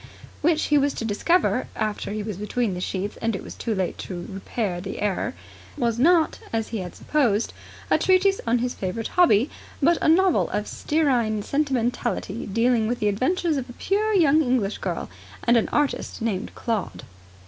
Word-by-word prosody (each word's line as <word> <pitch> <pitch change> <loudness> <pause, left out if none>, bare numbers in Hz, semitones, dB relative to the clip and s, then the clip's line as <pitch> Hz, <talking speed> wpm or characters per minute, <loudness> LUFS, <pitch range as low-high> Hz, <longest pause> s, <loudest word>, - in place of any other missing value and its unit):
which 315 0 +2
he 295 -1 +3
was 280 0 +1
to 225 - -3
discover 255 - +1
after 215 -2 -2
he 210 0 -3
was 210 -3 -5
between 210 +1 -1
the 180 - -4
sheets, 195 +2 -3
and 225 -2 -1
it - - -6
was - - -8
too 225 -2 -3
late 185 -2 -2
to 175 -2 -6
repair 195 -1 -3
the 195 - -6
error 205 - -1 0.4
was 235 -1 0
not, 330 +3 +4
as 225 -1 -1
he 225 - -3
had 180 -2 -6
supposed, 235 -8 +1 0.4
a - - +5
treatise 380 +1 +3
on 235 +2 +3
his 245 +1 -1
favourite 200 +4 -4
hobby, 270 - +4 0.3
but 335 +4 +3
a - - +3
novel 365 +1 +4
of 210 - -2
stearine 245 -9 +1
sentimentality 265 -4 -1
dealing 230 +2 +2
with 245 +2 -1
the 210 - +1
adventures 305 - 0
of 260 -2 -4
a - - -8
pure 420 - 0
young 315 -4 +5
English 245 -7 0
girl - - -3 0.4
and 235 - +4
an 230 - +2
artist 295 -2 -1
named 215 -5 -2
Claude. 210 - -3
235 Hz, 180 wpm, -24 LUFS, 210-295 Hz, 0.4 s, a